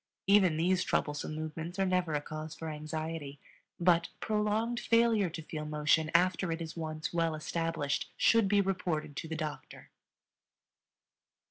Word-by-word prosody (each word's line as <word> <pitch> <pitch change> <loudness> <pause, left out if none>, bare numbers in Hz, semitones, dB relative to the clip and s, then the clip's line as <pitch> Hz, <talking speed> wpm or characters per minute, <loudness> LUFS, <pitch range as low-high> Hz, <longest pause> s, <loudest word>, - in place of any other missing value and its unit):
Even 190 -5 +5
these 180 +3 +2
troublesome 150 +1 -1
movements 160 +3 -5
are 195 - +2
never 180 -4 +1
a 145 - 0
cause 155 +1 -7
for 160 - -6
anxiety; 155 -1 -5 0.4
but 170 -1 +3
prolonged 215 +2 0
failure 230 -4 +3
to 165 0 -7
feel 155 0 -5
motion 150 +1 +2
after 180 0 +3
it 165 - -2
is 165 -1 -6
once 155 -1 -4
well 165 -2 +1
established 160 -2 -2
should 230 -3 +4
be 200 0 +4
reported 180 -6 -2
to 160 - -5
the 160 - -4
doctor. 155 -2 -6
165 Hz, 145 wpm, -31 LUFS, 155-185 Hz, 0.4 s, Even